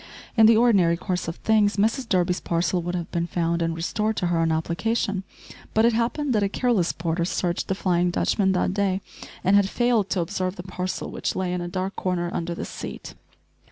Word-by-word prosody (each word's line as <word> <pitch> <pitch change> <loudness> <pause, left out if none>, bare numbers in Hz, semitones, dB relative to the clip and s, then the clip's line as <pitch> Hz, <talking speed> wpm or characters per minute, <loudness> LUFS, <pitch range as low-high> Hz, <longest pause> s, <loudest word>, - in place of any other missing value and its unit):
In 225 -2 +7
the 225 -1 +6
ordinary 195 -8 +4
course 180 -1 -3
of 165 - -3
things 215 -1 +2
Mrs 225 +4 +1
Durby's 180 -1 +2
parcel 170 +1 0
would 175 +1 -3
have 170 -2 -4
been 170 0 -1
found 170 -1 -1
and 165 0 0
restored 210 +6 -1
to - - 0
her 165 - +2
on 165 0 +2
application, 190 +5 -1 0.5
but 220 +1 +5
it 235 - +4
happened 250 +5 0
that 215 - +2
a 200 - +1
careless 215 -6 +1
porter 165 0 -2
searched 175 0 -1
the 190 - 0
"Flying 180 -2 +1
Dutchman" 190 +2 +1
that 185 0 0
day, 195 -1 0 0.4
and 190 +2 +4
had 200 -1 +4
failed 235 -5 +1
to 185 - 0
observe 185 +2 -2
the 175 - -7
parcel 185 0 -4
which - - -3
lay 185 -1 -1
in 180 - -2
a 175 - -4
dark 185 +2 -3
corner 175 -2 -1
under 170 0 -3
the - - -5
seat. - - -7
185 Hz, 210 wpm, -24 LUFS, 175-210 Hz, 0.5 s, In